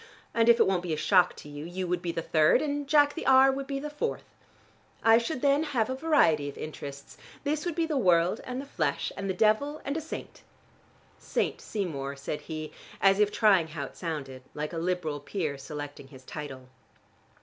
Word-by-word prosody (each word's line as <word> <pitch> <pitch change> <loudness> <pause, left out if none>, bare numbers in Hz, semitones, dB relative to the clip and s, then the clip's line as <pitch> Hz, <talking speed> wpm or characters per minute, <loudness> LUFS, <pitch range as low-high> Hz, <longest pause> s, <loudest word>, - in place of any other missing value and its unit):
And 230 0 +3
if 235 0 +6
it - - +6
won't 190 -2 +1
be 175 -3 -3
a - - -1
shock 180 +2 +4
to - - -11
you, 145 0 -7
you 180 +3 -4
would 175 0 -1
be 175 -1 -2
the 165 -1 -3
third, 155 -2 +4
and 290 -1 -2
Jack 290 0 +4
the 335 - -5
R. 265 0 +7
would 270 0 -4
be 275 -1 -2
the 295 - -5
fourth. 300 +11 -3 0.8
I 225 0 +7
should 250 +3 -4
then 280 +1 +4
have 260 -7 0
a - - -1
variety 215 - +3
of 140 - -10
interests: 140 -2 -8 0.3
this 300 +3 -1
would 340 - -2
be 335 -1 +1
the 305 -4 0
world 180 -1 +3
and 255 0 -5
the 275 - -6
flesh 280 - -1
and 195 -1 -4
the 190 - -1
devil, 225 +10 +2
and 280 - -2
a 320 - -2
saint." 315 - -8 0.8
"St. - - -2
Seymour," 140 -10 -4
said 140 +2 -5
he, 155 -1 -6 0.3
as 195 0 +4
if 210 0 +3
trying 195 -8 +4
how 155 -2 -5
it - - -12
sounded, 140 -6 -5
like 150 +3 -4
a 165 - -2
Liberal 170 -4 -1
peer 155 -1 -3
selecting 145 0 -8
his 130 -1 -15
title. 135 -4 -8
185 Hz, 210 wpm, -28 LUFS, -, 0.8 s, R